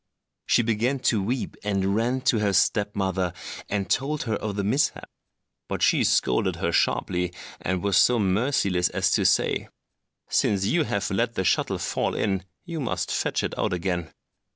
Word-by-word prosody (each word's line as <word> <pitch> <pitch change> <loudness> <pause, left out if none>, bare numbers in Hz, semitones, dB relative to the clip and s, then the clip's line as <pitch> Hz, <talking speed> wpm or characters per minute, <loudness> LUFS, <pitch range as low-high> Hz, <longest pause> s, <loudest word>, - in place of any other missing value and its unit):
She 120 - +4
began 115 +4 0 0.2
to 105 - +1
weep, 120 +6 -2
and 100 -1 0
ran 120 +4 0
to 125 -4 +2
her 100 -2 +1
step 105 +3 +2
mother 95 -2 -1 0.4
and 100 -1 -1
told 145 +3 0
her 110 - -2
of 105 -2 -4
the 100 - -1
mishap. 130 +9 0 0.6
But - - -3
she - - +4
scolded 60 - +2
her - - -1
sharply, 90 -1 0 0.3
and 95 0 -2
was 100 -2 +2
so 125 - +5
merciless 100 -3 +1
as - - 0
to - - +2
say, - - +1 0.6
"Since 95 -2 +1
you 160 +8 +2
have 100 - -2
let 115 +4 0
the 95 - 0
shuttle 90 - +1
fall - - -1
in, 95 -3 0 0.2
you 165 -2 -5
must 130 - -2
fetch - - -1
it - - -3
out - - 0
again." 90 -2 -2
100 Hz, 175 wpm, -25 LUFS, 95-120 Hz, 0.6 s, so